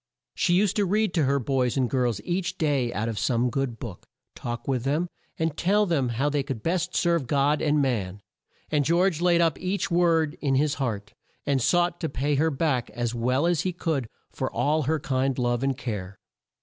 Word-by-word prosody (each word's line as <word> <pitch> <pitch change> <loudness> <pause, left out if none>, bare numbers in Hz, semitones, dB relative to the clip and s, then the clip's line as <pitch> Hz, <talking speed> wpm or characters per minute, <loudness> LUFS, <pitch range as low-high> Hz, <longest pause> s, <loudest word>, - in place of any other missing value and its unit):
She 175 - +2
used 200 +1 +2
to 205 - +3
read 210 +1 +1
to 160 -5 +2
her 140 +1 +2
boys 130 -1 0
and 130 -2 +2
girls 120 -4 0
each 180 +5 -2
day 140 -6 +1
out 115 -1 -2
of 115 -2 -3
some 120 0 +1
good 135 -3 -2
book, 115 -8 -8 0.3
talk 120 0 -6
with 130 -3 0
them, 150 +6 0 0.3
and 160 -2 -1
tell 205 +5 +2
them 145 -9 +1
how 120 +5 0
they 145 -1 +1
could 135 -5 -5
best 180 +1 -1
serve 170 -6 +1
God 145 +2 +2
and 150 -1 +2
man, 105 -7 -1 0.5
and 150 -2 +2
George 170 +2 +2
laid 175 -1 +4
up 165 -4 +1
each 185 +1 -2
word 165 -3 +3
in 135 -3 +1
his 145 +2 +2
heart, 105 -5 -3 0.3
and 140 -2 +1
sought 175 +5 +2
to 160 - -2
pay 140 +2 -1
her 155 +3 +2
back 140 -4 0
as 120 -1 -3
well 125 +5 +1
as 175 -3 +2
he 185 - -2
could 160 -8 -2 0.2
for - - -3
all 155 +2 +1
her 160 -1 +1
kind 135 -1 0
love 120 -1 0
and 135 -1 0
care. 100 -8 -5
140 Hz, 205 wpm, -26 LUFS, 125-170 Hz, 0.5 s, laid